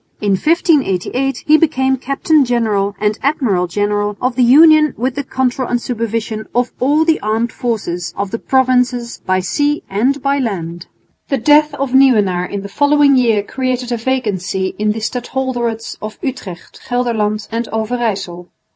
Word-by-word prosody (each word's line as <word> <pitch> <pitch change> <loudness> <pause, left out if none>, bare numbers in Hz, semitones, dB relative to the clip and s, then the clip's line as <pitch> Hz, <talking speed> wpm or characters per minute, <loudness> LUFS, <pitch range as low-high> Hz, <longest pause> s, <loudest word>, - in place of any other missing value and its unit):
In 205 -1 0
1588 270 - +1
he 310 +1 +5
became 265 -5 +2
Captain 275 +3 +1
General 215 -5 0
and 210 0 0
Admiral 240 -11 0
General 205 +2 -1
of 255 0 -1
the 255 - +1
Union 305 +4 +6
with 255 +3 -1
the 285 +2 -3
control 260 -1 -1
and 245 - 0
supervision 230 -2 -3
of 245 0 +1
all 295 +5 +2
the 320 -1 +2
armed 220 +2 -1
forces 200 -8 -3
of 200 -1 -3
the 230 - -3
Provinces 250 -2 0
by 185 0 +2
sea 290 +10 -1
and 250 +8 +1
by 280 0 +1
land. 175 -7 -4 0.4
The 275 - 0
death 295 +4 +3
of 275 -2 -3
Nieuwenaar 210 -10 +3
in 200 -1 -5
the - - -6
following 285 +5 +3
year 230 -5 +2
created 255 +2 -3
a 240 - 0
vacancy 205 -7 -2
in 210 0 +1
the 220 - -6
stadholderates 240 -1 -3
of 215 0 -7
Utrecht, 200 -10 -7
Gelderland 220 -4 -1
and 230 +1 -2
Overyssel. 215 -6 -3
240 Hz, 155 wpm, -16 LUFS, 210-265 Hz, 0.4 s, Union